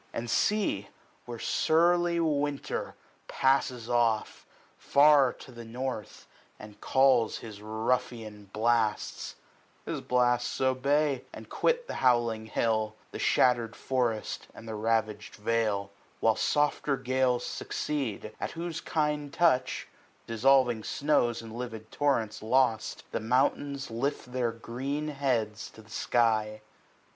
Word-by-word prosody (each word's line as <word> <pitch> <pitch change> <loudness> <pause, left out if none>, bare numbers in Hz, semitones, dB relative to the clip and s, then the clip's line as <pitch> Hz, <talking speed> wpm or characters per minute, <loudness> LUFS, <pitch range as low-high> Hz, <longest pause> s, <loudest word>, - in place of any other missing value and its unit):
10 - - -2
And 120 - -7
see 200 - +1 0.4
where 120 0 -6
surly 170 +6 +2
Winter 145 -3 -1 0.3
passes 130 -3 +1
off, 120 -3 0 0.3
Far 140 -2 +5
to 130 - -13
the 120 -1 -9
north, 120 -1 -5 0.3
and 105 -1 -13
calls 130 -4 +3
his 105 -3 -10
ruffian 110 -1 -2
blasts; 110 +1 0 0.5
His - - -3
blasts 125 -1 +1
obey, 135 +1 +1
and - - -11
quit 485 0 +1
the - - -6
howling 120 -3 +2
hill, 110 -1 0 0.2
The - - -6
shattered 120 -3 +2
forest, 120 -5 -2
and 115 - -11
the 110 - -5
ravag'd 110 -1 -1
vale; 105 -2 0 0.3
While 115 -1 +3
softer 145 -1 +1
gales 130 -1 +1
succeed, 120 -8 -3
at - - -4
whose 165 -1 -4
kind 150 -2 -1
touch, 130 -7 +2 0.3
15 - - -35
Dissolving 120 0 +3
snows 120 -5 +1
in 115 - -9
livid 115 -2 -7
torrents 135 -7 0
lost. 115 -1 +1
The - - -1
mountains 135 +3 0
lift 125 +2 -3
their 125 -2 0
green 135 +6 -4
heads 120 -7 -1
to 110 - -15
the 110 - -19
sky. 110 0 +1
120 Hz, 125 wpm, -29 LUFS, 110-140 Hz, 0.5 s, Far